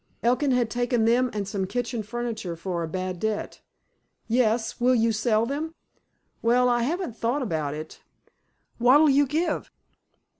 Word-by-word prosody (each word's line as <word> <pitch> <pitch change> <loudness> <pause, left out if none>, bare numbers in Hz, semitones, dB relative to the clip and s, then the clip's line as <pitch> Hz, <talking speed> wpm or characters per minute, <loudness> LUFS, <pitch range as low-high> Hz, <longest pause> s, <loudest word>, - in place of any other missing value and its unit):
Elkin 250 +4 +2
had 245 -3 +1
taken 245 -1 +1
them 245 +2 +3
and 205 -2 -3
some 195 -2 -2
kitchen 240 +1 -2
furniture 220 -5 -4
for 170 +1 -3
a 165 - -2
bad 185 +1 -4
debt. 220 +1 -3 0.7
"Yes. 230 -1 +1
Will 250 +1 +4
you 230 -1 +3
sell 220 0 +1
them?" 305 +6 -4 0.7
"Well, 245 +2 +3
I 240 -1 +2
haven't 310 - -2
thought 240 +5 -1
about 155 - -2
it. 155 +1 -9 0.8
What'll 280 +5 +6
you 280 +1 +4
give?" 315 +6 -1
235 Hz, 150 wpm, -25 LUFS, 210-250 Hz, 0.8 s, What'll